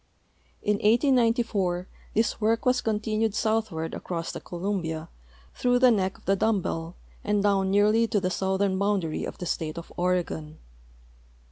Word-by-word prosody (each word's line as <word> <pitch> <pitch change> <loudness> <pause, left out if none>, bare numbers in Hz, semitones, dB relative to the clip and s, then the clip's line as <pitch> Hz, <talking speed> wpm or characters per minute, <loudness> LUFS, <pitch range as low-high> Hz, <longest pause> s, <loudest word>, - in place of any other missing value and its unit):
In 210 0 +2
1894 225 -6 +2 0.3
this 225 +1 +1
work 225 +2 +2
^tas 250 0 +1
con 215 -2 0
tinued 215 -1 -1
southward 215 -8 -1
across 170 -2 -4
the - - -7
Columbia 170 -3 -3 0.4
through 245 0 +2
the 250 0 +6
neck 190 -3 0
of - - -24
the 195 - +3
dumb 220 +1 +2
bell 165 -1 -4 0.3
and 205 -1 +1
down 195 -2 +2
nearly 210 +3 +4
to 210 - +1
the 185 -1 -1
southern 190 0 0
boundary 195 -6 0
of - - -7
the 180 - -5
state 160 -1 -3
of 170 - -8
Oregon. 175 -4 -1
200 Hz, 155 wpm, -26 LUFS, 180-220 Hz, 0.4 s, the